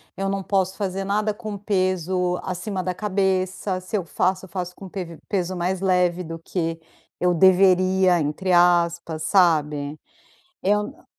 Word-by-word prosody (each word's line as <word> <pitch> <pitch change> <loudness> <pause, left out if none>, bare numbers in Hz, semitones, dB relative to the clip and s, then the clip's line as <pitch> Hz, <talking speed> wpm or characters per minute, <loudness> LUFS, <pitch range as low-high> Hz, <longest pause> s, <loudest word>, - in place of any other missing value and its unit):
eu 195 0 -2
não 195 0 -1
posso 190 -1 0
fazer 195 -1 -2
nada 210 +2 0
com 215 -2 -6
peso, 185 -2 0
acima 185 +1 -3
da 185 0 -2
cabeça. 190 -1 -1
Se 185 +4 -3
eu 185 - -3
faço, 185 +3 0
eu - - -17
faço 180 0 -4
com 195 - -10
pes 175 -4 -7
peso 185 -2 -1
mais 180 +2 -2
leve 180 -1 +2
do 165 0 -7
que 165 -1 -3 0.4
eu 180 0 +2
deveria, 185 0 +4
entre 165 +5 -1
aspas, 170 -2 +2
sabe. 150 -5 +2 0.6
Eu 210 +2 +2
n 295 +5 -14
185 Hz, 155 wpm, -23 LUFS, 175-195 Hz, 0.6 s, deveria